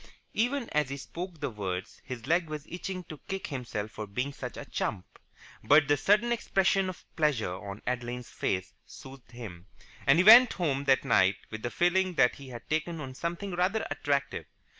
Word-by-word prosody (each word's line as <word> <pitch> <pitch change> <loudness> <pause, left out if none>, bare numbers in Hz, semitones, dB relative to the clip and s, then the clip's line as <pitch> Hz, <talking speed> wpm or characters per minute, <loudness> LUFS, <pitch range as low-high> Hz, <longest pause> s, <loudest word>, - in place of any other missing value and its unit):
Even 245 +2 0
as 150 -3 +1
he 140 - -4
spoke 170 +4 -7
the 140 -3 -2
words 95 -4 -5
his 125 -3 -7
leg 170 +2 +1
was 150 -1 -5
itching 185 +1 -5
to 155 -4 -10
kick 195 0 -3
himself 120 -6 -4
for 105 0 -6
being 125 +8 -3
such 125 -3 -7
a - - -6
chump, 90 - -3 0.6
but 145 0 +6
the 145 - +4
sudden 210 - +3
expression 195 -4 +2
of 185 - -9
pleasure 140 - +1
on 100 +2 -8
Adeline's 125 0 -3
face 90 0 -2
soothed 135 -2 -12
him; 105 -7 -9 0.4
and 135 +3 +6
he 180 - +5
went 235 +4 +9
home 140 -6 -1
that 135 -1 +3
night 95 +1 +4
with 110 0 -6
the 120 - -2
feeling 180 +4 +2
that 125 -5 +4
he 140 - -11
had 120 -2 -9
taken 160 +2 -1
on 135 -3 -6
something 170 +7 -4
rather 185 +5 0
attractive. 140 -1 -1
140 Hz, 185 wpm, -29 LUFS, 120-180 Hz, 0.6 s, went